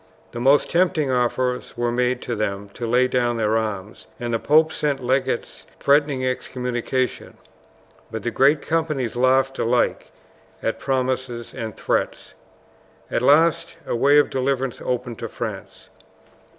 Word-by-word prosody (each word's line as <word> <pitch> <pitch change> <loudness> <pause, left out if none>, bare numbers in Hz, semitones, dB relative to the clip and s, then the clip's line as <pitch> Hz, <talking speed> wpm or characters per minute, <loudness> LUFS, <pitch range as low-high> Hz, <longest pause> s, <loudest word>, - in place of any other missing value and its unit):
The 120 - -6
most 135 +4 +3
tempting 170 -5 +2
offers 125 0 -1
were 120 0 0
made 125 +1 0
to 120 - -3
them 100 -1 -3
to 115 +4 -6
lay 125 +2 +3
down 120 -2 0
their 110 -1 +1
arms, 105 -2 -4
and 120 -1 -3
the 115 - +1
pope 155 +4 +3
sent 145 -2 -1
legates 130 0 -2
threatening 140 -2 +2
excommunication, 125 0 -2 0.7
but 110 - -6
the 120 - -1
great 140 +4 +3
companies 155 -8 -1
laughed 130 +2 +2
alike 120 +1 +1 0.5
at 115 0 -1
promises 130 -3 -2
and 110 -2 -6
threats. - - -2 0.8
At - - 0
last 160 +5 +3
a - - -2
way 140 +5 +4
of 145 - +4
deliverance 135 -1 -1
opened 125 -2 -3
to - - -4
France. - - -7
125 Hz, 140 wpm, -22 LUFS, 120-135 Hz, 0.8 s, way